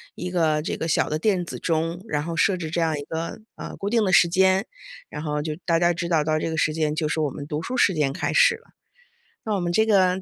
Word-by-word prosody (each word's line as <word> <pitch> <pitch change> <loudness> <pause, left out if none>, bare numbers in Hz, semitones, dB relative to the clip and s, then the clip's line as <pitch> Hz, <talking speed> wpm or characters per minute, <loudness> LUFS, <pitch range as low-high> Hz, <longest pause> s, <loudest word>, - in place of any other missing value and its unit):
一 180 0 -5
个 160 -4 +1
这 - - -3
个 165 - -3
小 155 - +1
的 155 - -2
电 190 -1 +1
子 - - -7
钟， 165 +1 -1
然 150 -6 -1
后 165 0 -5
设 190 - +3
置 170 -3 -5
这 170 - -1
样 160 -2 +1
一 - - -5
个， 165 +7 -5 0.2
呃， - - -7
固 200 - -4
定 230 0 +2
的 190 - 0
时 175 - +6
间， 190 +3 +3 0.4
然 - - -6
后 150 -1 -2
就 155 0 -4
大 165 - +2
家 175 +1 +3
知 170 0 -3
道 160 -3 +2
到 155 0 0
这 165 - -2
个 160 - -3
时 155 -1 +1
间 155 -1 -1
就 155 - -1
是 160 - -1
我 150 -2 +1
们 145 +1 -8
读 150 +1 -4
书 250 - -4
时 205 -6 +3
间 150 -4 0
开 - - -2
始 - - +5
了。 465 +1 -19 0.7
那 215 - -2
我 200 - 0
们 175 -1 -2
这 220 - +3
个 190 -3 +3
165 Hz, 300 characters per minute, -24 LUFS, 155-185 Hz, 0.7 s, 时